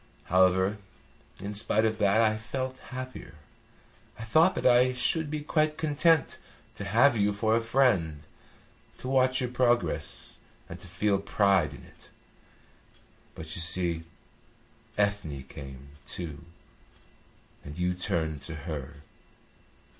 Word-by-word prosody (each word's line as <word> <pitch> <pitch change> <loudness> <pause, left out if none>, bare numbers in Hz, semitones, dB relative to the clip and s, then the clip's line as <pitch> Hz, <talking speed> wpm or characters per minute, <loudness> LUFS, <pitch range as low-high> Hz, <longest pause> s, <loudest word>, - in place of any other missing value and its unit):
However, 95 +3 +2 0.6
in 100 +2 -5
spite 110 +1 +3
of 110 0 -1
that 105 +2 +3
I 110 -1 +3
felt 130 +4 -5
happier. 130 -8 -8 0.8
I 115 - -7
thought 160 +11 +4
that - - -4
I 125 +1 +5
should 150 +5 0
be 150 0 -3
quite 155 0 0
content 155 0 +2 0.3
to - - -7
have 120 +6 +4
you 105 -1 +2
for 110 +2 +1
a 115 - +2
friend, 110 - +1 0.7
to - - -8
watch 130 0 +3
your 125 -1 -2
progress, 120 -8 0 0.3
and - - -9
to - - -11
feel 100 -2 0
pride 100 -6 +2
in - - -12
it. - - -18 1.3
But 80 0 -8
you 85 - -1
see 85 0 +1 0.9
Ethne 100 -10 -1
came, 70 -1 -11 0.2
too, 80 -4 -7 1.2
and 75 +1 -9
you 90 0 0
turned 85 -5 -2
to 75 +4 -7
her. 75 -2 -7
105 Hz, 130 wpm, -28 LUFS, 85-125 Hz, 1.3 s, I